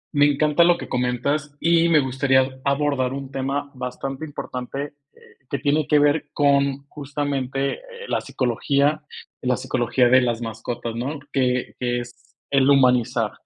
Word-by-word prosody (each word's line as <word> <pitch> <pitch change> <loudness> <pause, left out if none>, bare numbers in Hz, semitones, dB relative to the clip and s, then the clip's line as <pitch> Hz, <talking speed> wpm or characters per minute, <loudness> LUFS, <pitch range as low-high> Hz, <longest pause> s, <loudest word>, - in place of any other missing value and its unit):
Me 145 0 +6
encanta 150 +3 +3
lo 175 0 +4
que - - -7
comentas, 140 +4 -1
y 170 0 +3
me 160 -2 +5
gustaría 130 0 +1
abordar 140 -2 +1
un 135 -1 -6
tema 140 +1 -3
bastante 130 +2 -5
importante, 140 -1 -6 0.2
eh, - - -23 0.3
que 140 - -1
tiene 150 0 +1
que 150 - +4
ver 145 +1 +2
con 140 -1 +2
justamente, 140 -2 -2
eh, - - -14 0.3
la - - 0
psicología 140 +4 0 0.4
la 125 -1 +1
psicología 120 +1 +1
de 130 +1 +6
las 120 -2 -1
mascotas, 115 +1 -5
¿no? 135 +6 -3
Que 125 -2 0
que 120 -1 0
es 120 0 -14 0.2
el 135 -1 +4
humanizar. 125 -5 +3
135 Hz, 150 wpm, -23 LUFS, 125-145 Hz, 0.4 s, Me